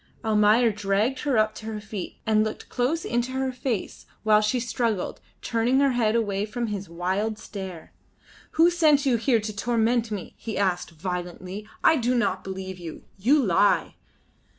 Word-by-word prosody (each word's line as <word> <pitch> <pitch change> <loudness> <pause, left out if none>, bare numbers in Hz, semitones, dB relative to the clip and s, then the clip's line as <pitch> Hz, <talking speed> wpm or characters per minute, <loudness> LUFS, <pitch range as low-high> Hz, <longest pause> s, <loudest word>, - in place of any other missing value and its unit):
Almayer 220 +2 +4
dragged 210 +5 0
her 280 -5 0
up 215 0 +3
to 220 - -9
her 220 -1 -4
feet 210 -3 -7
and 215 -1 +3
looked 215 - -5
close 275 +7 0
into 240 +2 -1
her 265 0 -1
face 245 -5 -4 0.2
while 215 -1 +5
she 215 +4 +1
struggled, 230 -4 -2 0.2
turning 235 +3 +2
her 280 -1 +4
head 230 -3 +1
away 205 -4 0
from 235 +3 -3
his 200 -4 -4
wild 190 +6 -1
stare. 190 -6 -8 0.6
"Who 335 +2 +5
sent 305 -5 +4
you 255 -3 +3
here 230 0 +2
to 215 0 -5
torment 230 +1 +1
me?" 205 -4 -5
he 225 - -5
asked, 185 -3 0
violently. 180 +4 -5 0.2
"I 320 - +6
do 250 0 +1
not 235 -1 0
believe 190 -1 -6
you. 165 -3 -8 0.2
You 265 +7 +4
lie." 200 +2 +3
220 Hz, 170 wpm, -25 LUFS, 200-245 Hz, 0.6 s, I